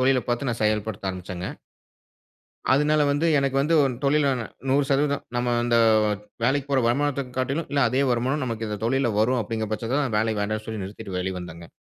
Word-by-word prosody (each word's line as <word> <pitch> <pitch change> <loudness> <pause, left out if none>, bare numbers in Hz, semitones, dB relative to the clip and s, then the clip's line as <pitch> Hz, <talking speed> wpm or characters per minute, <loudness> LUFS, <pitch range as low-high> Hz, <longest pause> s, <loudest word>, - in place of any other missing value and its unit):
தொழில 130 -1 +3
பாத்து 120 +2 -1
நான் 115 - -4
செயல்படுத்த 105 -2 -1
ஆரம்பிச்சேங்க. 90 0 -6 1.2
அதனால 150 +2 +3
வந்து 145 +4 +1
எனக்கு 135 -1 0
வந்து, 160 +4 +2
ஒரு 135 -2 +1
தொழில்ல 140 0 +3 0.4
100% 140 +1 +1
நம்ம 120 0 +1
அந்த 120 -1 +2 0.7
வேலைக்கு 140 +2 +1
போற 135 -2 +3
வருமானத்த 140 +2 0
காட்டிலும், 135 +5 -1
இல்ல 140 -1 +2
அதே 135 +2 +2
வருமானம் 130 +5 0
நமக்கு 115 -2 -3
இந்த 105 -1 -4
தொழில்ல 130 -2 +1
வரும் 125 +2 +2
அப்டிங்குற 110 0 -3
பட்சத்துல 115 +6 -1
தான், 125 -6 -2
வேலை 110 0 +1
வேண்டாம்னு 110 +1 -2
சொல்லி 110 -3 -4
நிறுத்திட்டு 100 -1 -7
வெளிய 95 0 -2
வந்தேங்க. 85 -1 -9
125 Hz, 170 wpm, -24 LUFS, 110-140 Hz, 1.2 s, தொழில